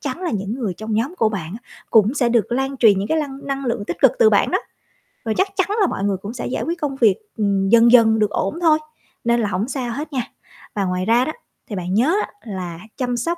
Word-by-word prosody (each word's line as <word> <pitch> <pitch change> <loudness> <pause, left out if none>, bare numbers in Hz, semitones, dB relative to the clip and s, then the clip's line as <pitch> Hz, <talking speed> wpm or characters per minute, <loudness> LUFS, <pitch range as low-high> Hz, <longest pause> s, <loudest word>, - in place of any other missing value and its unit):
chắn 290 +6 -5
là 355 - -1
những 200 0 -3
người 225 -8 -3
trong 220 +2 -4
nhóm 255 +11 -1
của 220 - +3
bạn 185 -5 -5
á - - -30 0.2
cũng 220 +4 +4
sẽ 245 -4 +2
được 235 -1 +1
lan 270 +2 -1
truyền 210 -6 +5
những 200 - -3
cái 320 - +1
lăng 280 -2 -5
năng 275 0 -3
lượng 235 -4 -2
tích 175 - -4
cực - - +7
từ 455 -3 +6
bạn - - +3
đó. - - +2 0.7
Rồi 220 -1 -1
chắc 385 - +3
chắn 375 -1 +2
là 385 - +4
mọi 195 - -3
người 200 -2 0
cũng 205 +5 -7
sẽ 245 - -5
giải - - -2
quyết 335 +1 -3
công 280 -2 -2
việc, 220 -7 +4 0.2
ừm, 200 -2 +1
dần 235 +1 +6
dần 220 -3 +6
được 210 - +2
ổn 195 - -2
thôi, 315 -2 +4 0.4
nên 235 0 +2
là 205 - 0
hổng 200 +5 -1
sao 255 -3 -3
hết 290 +3 -6
nha. 255 - 0 0.5
Và 200 -2 0
ngoài 180 0 -1
ra 235 +3 +3
đó, 310 - -2 0.4
thì 210 - -4
bạn 180 -1 -3
nhớ 260 - +3
á, - - -5
là 185 -6 -6 0.2
chăm 245 -2 -1
sóc 335 +9 -1
235 Hz, 265 wpm, -20 LUFS, 205-275 Hz, 0.7 s, cực